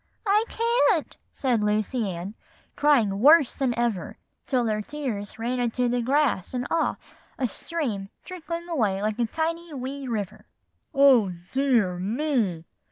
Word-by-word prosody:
"'I 420 +2 +3
can't,' 460 -7 +1 0.2
said 245 -5 0
Lucy 210 +2 0
Ann, 180 +3 -5 0.4
crying 235 -10 +3
worse 295 +3 +6
than 255 -4 -1
ever, 235 -6 -1 0.3
till 250 -3 +1
her 215 -1 0
tears 220 -6 -5
ran 240 +3 -2
into 245 +1 0
the 245 0 0
grass 260 -4 +1
and 250 0 -2
off, 330 - -1 0.2
a - - -4
little 245 - -1
stream 230 -13 -4
trickling 340 -1 -6
away 220 - 0
like 215 +2 -1
a 235 - +2
tiny, 330 +2 -3
wee 270 +1 -5
river. 210 -3 -4 0.4
"'Oh, 265 - +5 0.2
dear 240 -10 +2
me! 215 - -1
245 Hz, 145 wpm, -25 LUFS, 210-295 Hz, 0.4 s, worse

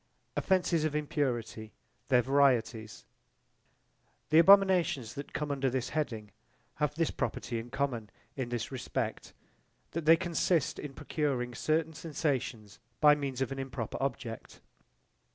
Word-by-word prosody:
Offences 180 -4 +2
of 155 -1 -1
impurity 120 - -2 0.3
their 125 -2 +4
varietys 125 -5 +1 1.3
The 155 - +7
abominations 180 - +5
that 140 - -7
come 150 -1 -3
under 135 -1 0
this 130 -1 -2
heading 115 -9 -3 0.5
have 150 -1 0
this 165 0 +1
property 120 -3 -3
in 115 +2 -8
common, 125 -5 -2 0.3
in 130 -3 -3
this 120 0 -3
respect, 130 -2 -4 0.6
that 165 -1 -4
they 165 +1 +7
consist 170 -3 0
in 140 -2 -7
procuring 140 -5 -2
certain 160 +5 0
sensations 135 - -3 0.2
by 150 -1 +7
means 140 -3 -3
of 130 - -1
an 135 - -4
improper 130 -4 -4
object. 120 -4 -4
135 Hz, 130 wpm, -31 LUFS, 120-155 Hz, 1.3 s, The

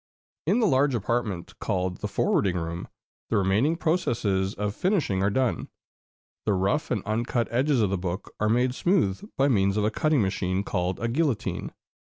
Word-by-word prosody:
In 200 +8 +3
the 230 - +3
large 140 -5 +3
apartment 105 -5 -2
called 90 -2 -1
the 105 - -3
forwarding 105 - +1
room, 85 +1 -4 0.4
the 115 - +2
remaining 100 - +2
processes 115 - 0
of 105 0 -2
finishing 165 - 0
are 100 - +3
done. 125 +3 0 0.8
The 105 - +1
rough 100 +10 0
and 105 - -1
uncut 115 +2 -1
edges 130 +1 +2
of 100 - +1
the 100 - 0
book 90 +1 -4
are 105 - +2
made 125 +2 +2
smooth 150 - +1 0.2
by 135 - +4
means 100 -6 +2
of 105 - +1
a 105 - +2
cutting 150 0 +2
machine 95 0 -1
called 90 -2 -1
the 115 - -2
"guillotine." 135 0 -1
110 Hz, 175 wpm, -26 LUFS, 95-135 Hz, 0.8 s, by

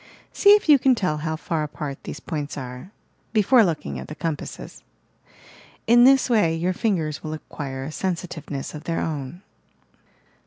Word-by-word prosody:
See 405 - +4
if 415 - -1
you 295 -3 +7
can 260 0 +4
tell 180 -9 -1
how 160 +1 -3
far 160 0 -3
apart 150 -2 -6
these - - -6
points 150 -2 -5
are, 125 +5 -7 0.2
— - - -41
before 230 +4 +5
looking 150 - -2
at 65 - -8
the - - -8
compasses. 160 -3 -5 1.0
In 240 +1 +6
this 270 0 +5
way 210 -10 +2
your 175 +3 0
fingers 170 -8 -1
will 155 - -4
acquire 135 -3 -6
a 145 - -6
sensitiveness 165 -6 -4
of 150 0 -9
their 165 - -1
own. 155 +3 -4
160 Hz, 165 wpm, -23 LUFS, 150-200 Hz, 1.0 s, you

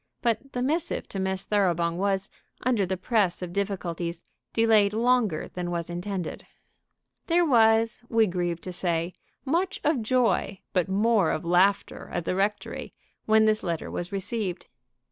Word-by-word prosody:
But 235 +3 -1
the 245 - -1
missive 310 +5 -1
to 195 - -4
Miss 190 0 -2
Thoroughbung 175 -5 +1
was, 195 +1 0 0.4
under 230 -6 +2
the 190 +1 -2
press 190 -3 +1
of 175 -1 -6
difficulties, 175 -4 -3 0.3
delayed 220 -3 +4
longer 230 -6 +1
than 180 -1 -3
was 170 -1 -3
intended. 180 0 -4 0.8
There 345 +1 +3
was, 225 -3 +4
we 225 -1 +4
grieve 175 -3 -2
to 185 - -7
say, 170 -1 -1 0.3
much 355 +7 0
of 295 -5 +2
joy 225 -4 +1
but 180 -1 +1
more 205 -2 +3
of 155 - -2
laughter 185 +4 +2
at 175 -1 -3
the - - 0
rectory 205 +2 -2 0.3
when 220 0 +5
this 215 0 +3
letter 170 -3 -3
was 175 +2 -4
received. 195 -1 -3
200 Hz, 150 wpm, -26 LUFS, 175-225 Hz, 0.8 s, when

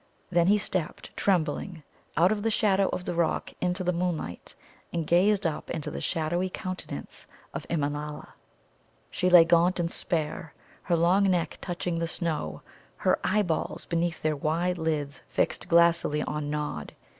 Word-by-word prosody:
Then 170 -1 +3
he 205 +2 +5
stepped, 185 -5 -3
trembling, 175 -2 0 0.3
out 175 +5 +5
of 215 -1 0
the 225 - +1
shadow 200 -3 +2
of 180 - -4
the - - -2
rock 170 -2 0
into 180 +1 0
the 180 0 +1
moonlight, 170 - -3 0.4
and 170 -2 -2
gazed 195 +5 +3
up 160 -2 -2
into 160 -3 -3
the - - -5
shadowy 175 +2 0
countenance 185 - -6 0.3
of - - -6
Immanâla. 150 -1 -3 0.8
She 180 - +1
lay 175 -2 +9
gaunt 175 +2 +3
and 170 0 0
spare, 160 -2 -2 0.3
her 175 - +1
long 185 +4 +4
neck 175 -3 0
touching 175 -1 -2
the 165 - -1
snow, 160 - -2 0.3
her - - +2
eye 210 +2 +2
balls 165 -4 -2
beneath 170 0 -1
their 155 -1 +1
wide 170 +5 0
lids 150 -3 -2
fixed - - 0
glassily 170 -3 +4
on 150 -1 -3
Nod. 150 0 -3
170 Hz, 155 wpm, -28 LUFS, 155-180 Hz, 0.8 s, lay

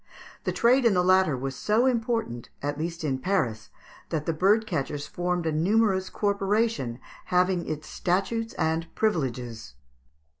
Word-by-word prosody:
The - - +1
trade 250 +3 +4
in 230 -5 +4
the 180 - +3
latter 185 -6 +4
was 135 +1 -4
so 215 - +2
important, 225 - -1
at 145 +1 -2
least 170 +1 -4
in 135 -4 -1
Paris, 125 - -1 0.4
that 155 -2 -2
the 165 - 0
bird 200 +7 +3
catchers 145 -5 -3
formed 175 +2 -2
a 160 - +1
numerous 190 +4 +2
corporation 200 - 0 0.3
having 180 0 +1
its 155 0 -4
statutes 200 +6 -1
and 160 +1 0
privileges. 125 - -2
180 Hz, 145 wpm, -26 LUFS, 145-210 Hz, 0.4 s, trade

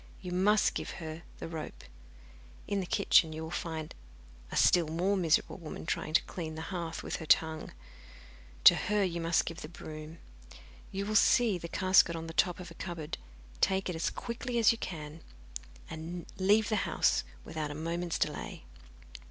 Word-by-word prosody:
You 180 -2 -7
must 195 +4 +3
give - - -4
her 160 -2 -6 0.2
the - - -6
rope. 160 -2 -7 0.8
In 200 - 0
the 185 - -3
kitchen 175 -5 +4
you 160 +1 -5
will 160 - -6
find 160 -3 -4 0.6
a - - -4
still 175 -3 +5
more 175 +6 +1
miserable 170 -4 +2
woman 165 -3 -8
trying 155 -1 -2
to - - +5
clean 160 -3 -6
the 160 - -5
hearth 170 -2 -4
with - - -3
her 160 - -8
tongue; 160 0 +2 0.9
to - - +11
her 210 0 +1
you 170 -2 -1
must 165 0 +2
give 165 0 -6
the 150 - -7
broom. 155 -1 -9 0.7
You 195 +1 -3
will 215 - -2
see 210 -2 +5
the 170 - -6
casket 185 -1 +4
on 165 0 -5
the 165 - -7
top 180 +2 +2
of 180 - -8
a - - -9
cupboard, 170 -4 -6 0.4
take 190 0 +2
it 180 - -2
as 160 - 0
quickly 235 +1 -4
as 230 -2 +6
you 230 - -3
can, 155 -3 -6 0.7
and 165 +2 -6
leave 205 +3 +4
the 215 - +2
house - - +2 0.2
without 155 -2 -4
a 145 - -6
moment's 170 +2 -2
delay. - - -3
170 Hz, 180 wpm, -31 LUFS, 160-190 Hz, 0.9 s, to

